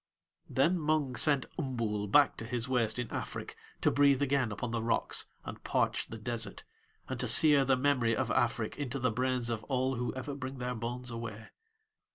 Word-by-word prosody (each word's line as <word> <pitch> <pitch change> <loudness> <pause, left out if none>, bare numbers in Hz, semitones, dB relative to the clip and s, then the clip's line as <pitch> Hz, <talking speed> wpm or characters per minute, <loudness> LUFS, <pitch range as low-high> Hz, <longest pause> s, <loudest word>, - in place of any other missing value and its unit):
Then 165 +7 +2
Mung 150 -4 0
sent 140 +3 +3
Umbool 115 -8 -2
back 145 +2 +5
to 115 - -5
his 120 +1 -2
waste 120 -4 0
in 120 -1 -2
Afrik - - -5 0.3
to - - +3
breathe 140 -1 +4
again 135 -4 +1
upon 115 +3 -4
the 115 -1 -1
rocks, 115 - -1 0.2
and - - -8
parch - - 0
the 115 - -8
desert, 110 -2 -4 0.4
and - - -4
to - - 0
sear 145 -3 +7
the 130 0 +3
memory 125 -4 +2
of - - -1
Afrik - - 0
into 140 -2 -3
the 125 -2 0
brains 125 0 0
of 110 -1 -3
all 130 -1 0
who 125 0 -2
ever 130 +2 -5
bring 135 -1 -6
their 125 0 -3
bones 120 +2 -4
away. 115 -1 -7
125 Hz, 190 wpm, -31 LUFS, 115-135 Hz, 0.4 s, sear